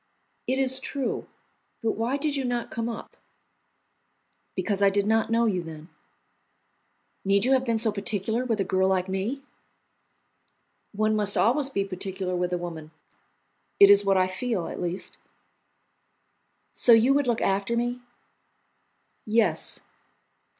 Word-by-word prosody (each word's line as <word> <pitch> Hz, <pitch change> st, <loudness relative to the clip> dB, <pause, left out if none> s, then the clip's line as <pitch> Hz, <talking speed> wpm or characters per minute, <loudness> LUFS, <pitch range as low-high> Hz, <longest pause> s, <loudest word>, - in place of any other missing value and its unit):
"It 260 Hz, -, 0 dB
is 265 Hz, -1 st, +2 dB
true, 265 Hz, 0 st, -3 dB, 0.6 s
but 225 Hz, -, +2 dB
why 235 Hz, +5 st, -1 dB
did 295 Hz, 0 st, -1 dB
you 275 Hz, -, -1 dB
not 245 Hz, -2 st, -3 dB
come 230 Hz, +1 st, -3 dB
up?" 230 Hz, -, -8 dB, 1.4 s
"Because 205 Hz, -2 st, -1 dB
I 200 Hz, -, +6 dB
did 200 Hz, 0 st, 0 dB
not 220 Hz, +1 st, +1 dB
know 230 Hz, +1 st, +2 dB
you 190 Hz, -5 st, 0 dB
then." 160 Hz, 0 st, -10 dB, 1.3 s
"Need 200 Hz, +2 st, +2 dB
you 260 Hz, -, +2 dB
have 260 Hz, -1 st, +3 dB
been 230 Hz, -2 st, +1 dB
so 220 Hz, 0 st, +1 dB
particular 210 Hz, +3 st, -2 dB
with 230 Hz, -4 st, -1 dB
a -, -, +2 dB
girl 190 Hz, 0 st, +1 dB
like 190 Hz, -1 st, +1 dB
me?" 200 Hz, +9 st, -3 dB, 1.5 s
"One 215 Hz, +1 st, 0 dB
must 205 Hz, -1 st, +2 dB
always 265 Hz, +5 st, +2 dB
be 200 Hz, -7 st, -1 dB
particular 190 Hz, -1 st, -4 dB
with 180 Hz, 0 st, -1 dB
a 180 Hz, -, 0 dB
woman; 165 Hz, -3 st, -7 dB, 0.9 s
it 200 Hz, 0 st, +9 dB
is 205 Hz, 0 st, +6 dB
what 195 Hz, -1 st, +2 dB
I 185 Hz, -, +4 dB
feel, 185 Hz, 0 st, -3 dB
at -, -, -6 dB
least." 175 Hz, +2 st, -4 dB, 1.5 s
"So 240 Hz, -, +6 dB
you 230 Hz, +4 st, +5 dB
would 285 Hz, -1 st, +1 dB
look 235 Hz, -2 st, +1 dB
after 200 Hz, +4 st, 0 dB
me?" 245 Hz, +1 st, -2 dB, 1.3 s
"Yes." 220 Hz, +1 st, +2 dB
215 Hz, 145 wpm, -26 LUFS, 190-240 Hz, 1.5 s, it